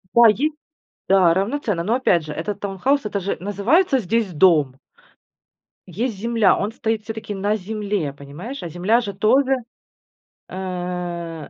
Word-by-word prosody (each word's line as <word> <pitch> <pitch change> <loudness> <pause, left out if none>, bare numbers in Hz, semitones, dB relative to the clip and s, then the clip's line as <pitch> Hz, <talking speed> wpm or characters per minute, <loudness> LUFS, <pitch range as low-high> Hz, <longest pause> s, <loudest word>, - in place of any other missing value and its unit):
Да, 235 - +7
е 220 +6 0 0.7
Да, 185 -3 +5
равноценно, 200 -3 -1
но, 220 - +1
опять 180 -10 +2
же, 150 - -6
этот 180 +7 -4
таунхаус- 210 +7 0
это 200 -1 -2
же 195 - -2
называется 245 - +2
здесь 220 -1 -1
дом. 150 -5 +3 1.1
Есть 220 +4 -3
земля, 225 -2 +3
он 205 +2 -2
стоит 225 -3 -2
всё-таки 220 -1 -6
на 205 +2 0
земле, 205 -5 -3
понимаешь? 145 - -8
А 175 - -4
земля 185 +8 +2
же 200 -3 -5
тоже, 255 +7 +3 0.9
э 180 -2 -4
200 Hz, 140 wpm, -21 LUFS, 180-225 Hz, 1.1 s, Да